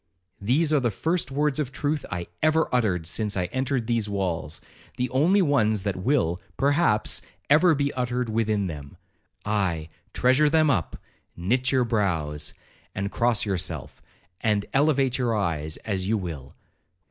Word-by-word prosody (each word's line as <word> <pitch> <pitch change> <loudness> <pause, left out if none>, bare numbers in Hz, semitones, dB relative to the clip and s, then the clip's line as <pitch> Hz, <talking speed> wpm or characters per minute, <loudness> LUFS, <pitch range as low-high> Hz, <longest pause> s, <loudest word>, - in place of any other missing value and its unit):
These 145 +10 +2
are 150 - +5
the 120 -3 +1
first 160 - -1
words 145 +2 0
of 140 -4 -2
truth 145 +1 -2
I 85 -1 -3 0.2
ever 155 +1 +3
uttered 100 -9 +1
since 105 +4 -1
I 90 - +1
entered 130 -2 0
these 115 -3 0
walls—the 95 - -4
only 175 +10 +4
ones 110 - +2
that 100 -2 -1
will, 95 - 0 0.2
perhaps, 140 - +2 0.3
ever 160 +2 +6
be 140 0 0
uttered 125 -1 -1
within 110 -2 0
them—aye, 85 +3 -4 0.2
treasure 130 +4 +3
them 155 -1 +4
up, 95 - -1 0.4
knit 125 +9 +1
your 130 -2 +3
brows, 80 -10 -1 0.4
and 100 +1 -2
cross 120 -2 +1
yourself, 95 -4 -3 0.4
and 105 -2 +1
elevate 135 -3 +2
your 120 -3 +1
eyes 80 -5 -2
as 95 -3 -2
you 110 +2 +2
will. 80 -9 -6
115 Hz, 145 wpm, -25 LUFS, 95-140 Hz, 0.4 s, ever